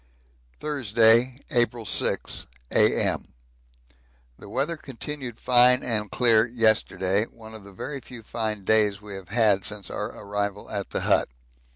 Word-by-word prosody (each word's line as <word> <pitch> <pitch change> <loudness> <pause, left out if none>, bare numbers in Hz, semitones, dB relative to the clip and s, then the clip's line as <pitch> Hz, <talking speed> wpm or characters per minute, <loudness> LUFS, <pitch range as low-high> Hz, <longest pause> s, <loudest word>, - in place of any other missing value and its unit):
Thursday, 120 -2 +3
April 120 -3 +1
6, - - 0 0.2
A.M. - - +2 1.1
The - - -12
weather 155 +5 -1
continued 135 -3 -7
fine 125 0 +4
and 105 -4 -1
clear 115 -2 +4
yesterday 110 -3 +1
one 110 -1 -14
of 110 -2 -10
the 100 - -13
very 140 +9 -6
few 120 -3 -11
fine 110 -2 -3
days 105 -1 +2
we 105 -1 -9
have 95 -2 -9
had 105 -3 +3
since 105 -4 -6
our - - -3
arrival 100 0 -4
at 100 -2 -4
the - - -3
hut. - - +2
110 Hz, 140 wpm, -25 LUFS, 105-125 Hz, 1.1 s, fine